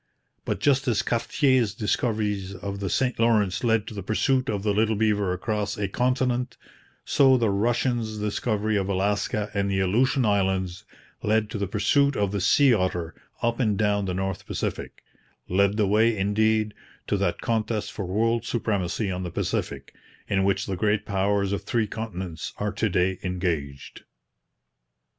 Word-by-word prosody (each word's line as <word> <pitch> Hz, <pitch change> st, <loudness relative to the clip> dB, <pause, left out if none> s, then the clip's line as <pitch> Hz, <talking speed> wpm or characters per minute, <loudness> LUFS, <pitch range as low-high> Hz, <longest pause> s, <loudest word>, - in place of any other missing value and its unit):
But -, -, -2 dB
just 140 Hz, -1 st, +2 dB
as 115 Hz, -4 st, +2 dB
Cartier's 120 Hz, -2 st, +1 dB
discovery 105 Hz, -2 st, -1 dB, 0.2 s
of 100 Hz, +2 st, -5 dB
the 100 Hz, -2 st, -2 dB
St 125 Hz, +5 st, 0 dB
Lawrence 105 Hz, -4 st, +2 dB
led 115 Hz, -3 st, +2 dB
to 110 Hz, -, -8 dB
the 100 Hz, -, -5 dB
pursuit 125 Hz, +6 st, +1 dB
of 100 Hz, -2 st, -2 dB
the 105 Hz, -1 st, +1 dB
little 110 Hz, +1 st, +2 dB
beaver 105 Hz, -3 st, +1 dB
across 100 Hz, +2 st, -2 dB
a 100 Hz, -1 st, -1 dB
continent, 125 Hz, +2 st, 0 dB, 0.5 s
so 135 Hz, -2 st, +5 dB
the 115 Hz, -4 st, +1 dB
Russians' 115 Hz, +1 st, 0 dB
discovery 105 Hz, 0 st, -1 dB
of 95 Hz, 0 st, -1 dB
Alaska 100 Hz, +2 st, 0 dB
and 100 Hz, 0 st, 0 dB
the 95 Hz, -1 st, 0 dB
Aleutian 120 Hz, +7 st, +2 dB
Islands 95 Hz, -3 st, 0 dB, 0.4 s
led 110 Hz, 0 st, +1 dB
to 105 Hz, -, -4 dB
the 100 Hz, -, -1 dB
pursuit 135 Hz, +8 st, +2 dB
of 100 Hz, -2 st, 0 dB
the 100 Hz, -1 st, -2 dB
sea 140 Hz, -, +5 dB
otter 90 Hz, -4 st, -1 dB, 0.3 s
up 115 Hz, +1 st, 0 dB
and 105 Hz, -6 st, +1 dB
down 105 Hz, -2 st, +1 dB
the 90 Hz, -1 st, -2 dB
North 95 Hz, 0 st, -3 dB
Pacific; -, -, -4 dB, 0.4 s
led 100 Hz, +3 st, +2 dB
the 105 Hz, -, +3 dB
way, 110 Hz, +3 st, +3 dB
indeed, 110 Hz, +2 st, +1 dB, 0.3 s
to -, -, 0 dB
that 90 Hz, -3 st, -1 dB
contest 110 Hz, -2 st, -1 dB
for 100 Hz, -, -5 dB
world 115 Hz, +5 st, +1 dB
supremacy 100 Hz, -3 st, -1 dB
on 90 Hz, 0 st, -3 dB
the 90 Hz, -, -4 dB
Pacific 85 Hz, -, -3 dB, 0.3 s
in 95 Hz, -1 st, +1 dB
which 100 Hz, 0 st, +1 dB
the 95 Hz, -, -3 dB
great 105 Hz, +2 st, 0 dB
powers 100 Hz, 0 st, 0 dB
of 100 Hz, -, -1 dB
three 115 Hz, -2 st, 0 dB
continents 95 Hz, -7 st, -6 dB
are 105 Hz, 0 st, -1 dB
to 110 Hz, -, -1 dB
day 90 Hz, 0 st, +1 dB
engaged. 85 Hz, -7 st, -3 dB
105 Hz, 165 wpm, -25 LUFS, 95-115 Hz, 0.5 s, so